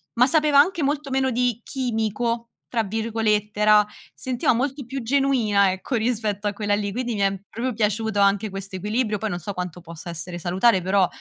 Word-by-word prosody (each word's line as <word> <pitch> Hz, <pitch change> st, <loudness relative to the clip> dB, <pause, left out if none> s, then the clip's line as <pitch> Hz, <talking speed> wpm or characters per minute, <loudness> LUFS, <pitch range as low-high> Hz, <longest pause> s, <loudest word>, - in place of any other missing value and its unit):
ma 245 Hz, +2 st, +5 dB
sapeva 300 Hz, -1 st, +4 dB
anche 340 Hz, +2 st, +3 dB
molto 290 Hz, 0 st, -1 dB
meno 265 Hz, 0 st, +1 dB
di 245 Hz, -1 st, 0 dB
"chimico" 235 Hz, -2 st, -2 dB, 0.2 s
tra 230 Hz, -2 st, +1 dB
virgolette, 215 Hz, -1 st, -1 dB
era 210 Hz, 0 st, +6 dB, 0.3 s
sentiva 255 Hz, -2 st, 0 dB
molto 270 Hz, +3 st, -2 dB
più 270 Hz, +2 st, -5 dB
genuina, 230 Hz, -7 st, +3 dB
ecco, 190 Hz, +7 st, -4 dB
rispetto 215 Hz, -3 st, -1 dB
a 205 Hz, -, -1 dB
quella 205 Hz, 0 st, -1 dB
lì. 205 Hz, -1 st, -2 dB
Quindi 245 Hz, -1 st, -2 dB
mi -, -, -4 dB
è 195 Hz, -1 st, +1 dB
proprio 245 Hz, +3 st, -3 dB
piaciuto 215 Hz, 0 st, 0 dB
anche 200 Hz, +2 st, +3 dB
questo 195 Hz, 0 st, -6 dB
equilibrio, 210 Hz, +2 st, -1 dB
poi 220 Hz, +2 st, -3 dB
non 175 Hz, -, -3 dB
so 200 Hz, +4 st, -5 dB
quanto 180 Hz, -2 st, -5 dB
possa 170 Hz, 0 st, -10 dB
essere 175 Hz, +1 st, -6 dB
salutare, 185 Hz, +4 st, +3 dB
però 190 Hz, 0 st, +3 dB
220 Hz, 185 wpm, -23 LUFS, 200-250 Hz, 0.3 s, era